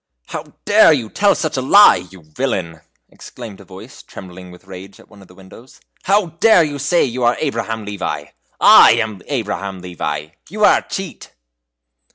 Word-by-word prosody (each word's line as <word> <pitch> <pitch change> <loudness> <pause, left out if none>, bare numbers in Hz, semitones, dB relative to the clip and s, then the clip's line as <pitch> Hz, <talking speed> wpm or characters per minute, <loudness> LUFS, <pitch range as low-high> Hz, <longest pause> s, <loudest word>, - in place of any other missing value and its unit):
"How - - -8
dare 205 -4 +5
you 120 -7 -4
tell 205 0 +2
such 155 -4 -4
a - - -1
lie, 130 - +5
you 95 -2 -16
villain?" 85 - -5 0.3
exclaimed 100 -4 -12
a - - -16
voice, - - -14
trembling 90 -1 -13
with 90 +1 -16
rage, 95 +1 -12
at - - -20
one 100 -2 -17
of 95 - -17
the 90 - -19
windows; 95 +7 -17 0.3
"how 200 +1 +2 0.2
dare 220 -7 +5
you 145 -2 -5
say 170 +5 +1
you 125 -1 -5
are 120 +1 +1
Abraham 115 -6 -4
Levi? 95 -8 -5 0.3
I - - +7
am 110 -4 -3
Abraham 105 -7 -4
Levi! 75 -4 -6 0.2
You 210 +4 0
are - - +4
a - - -19
cheat!" 190 -4 -8
110 Hz, 180 wpm, -17 LUFS, 90-145 Hz, 0.3 s, I